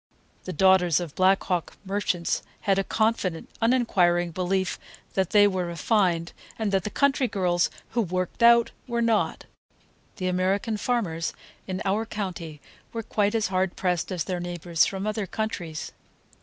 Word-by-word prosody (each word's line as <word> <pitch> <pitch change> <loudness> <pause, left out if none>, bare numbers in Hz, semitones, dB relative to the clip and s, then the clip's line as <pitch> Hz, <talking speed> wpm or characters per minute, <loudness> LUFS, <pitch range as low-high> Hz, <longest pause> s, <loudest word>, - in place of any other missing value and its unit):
The 185 - -4
daughters 180 -1 +4
of 170 -5 -6
Black 190 +1 +3
Hawk 180 -3 -2
merchants 190 -3 -1 0.2
had 195 -2 +2
a - - +1
confident, 215 -6 -1
uninquiring 180 -8 +3
belief 185 +2 -1 0.3
that 190 -2 +1
they 205 -1 +6
were 185 -3 -1
"refined," 170 -1 +1 0.2
and 220 -3 -1
that 195 -2 +1
the - - -1
country 280 +2 +2
girls, 180 -5 +1 0.2
who 235 - +1
"worked 185 -1 -3
out," 235 0 +6 0.2
were 235 -1 0
not. 225 -2 +1 0.7
The 185 - -3
American 190 +4 0
farmers 200 -9 -1 0.3
in 185 -1 -3
our 210 +3 0
county 175 -8 -5 0.3
were 230 -1 -4
quite 210 +1 0
as 220 -4 +1
hard 185 -1 0
pressed 180 0 -1
as 180 -4 -1
their 180 +1 -3
neighbors 175 -1 0
from 195 0 -4
other 215 -2 -2
countries. 175 -7 -4
190 Hz, 155 wpm, -26 LUFS, 175-215 Hz, 0.7 s, they